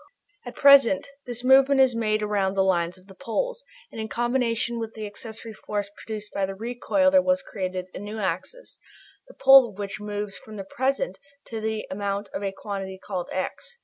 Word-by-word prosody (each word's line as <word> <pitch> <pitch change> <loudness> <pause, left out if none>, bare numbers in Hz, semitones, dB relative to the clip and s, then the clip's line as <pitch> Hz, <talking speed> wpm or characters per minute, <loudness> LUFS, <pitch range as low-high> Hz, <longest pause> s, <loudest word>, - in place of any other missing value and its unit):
At 245 - -7
present 280 -1 +6 0.2
this 245 0 -5
movement 270 +1 +6
is 260 -3 +5
made 215 -2 0
around 200 -2 0
the 190 - +3
lines 175 -1 +1
of 185 - -20
the 195 - -14
poles, - - -3 0.3
and 225 - -6
in 220 - -4
combination 240 0 0
with 225 -1 -5
the 215 -1 -5
accessory 220 +2 -8
force 205 -1 -4
produced 210 -1 -7
by 195 -1 0
the 195 - -6
recoil 245 +6 +1
there 280 -1 +6
was 275 0 +1
created 185 -2 -4
a - - -6
new 205 +2 -6
axis, 200 - -4 0.5
the - - -15
pole 270 -2 +8
of 200 - -15
which 200 -1 -5
moves 205 -1 -4
from 215 - -12
the 195 - -5
present 270 - -1 0.3
to 225 -2 -4
the 220 0 -2
amount 200 +1 -3
of - - -3
a 195 -1 -1
quantity 195 -1 -6
called 185 -2 -5
"x." 480 - -4
215 Hz, 195 wpm, -25 LUFS, 195-250 Hz, 0.5 s, pole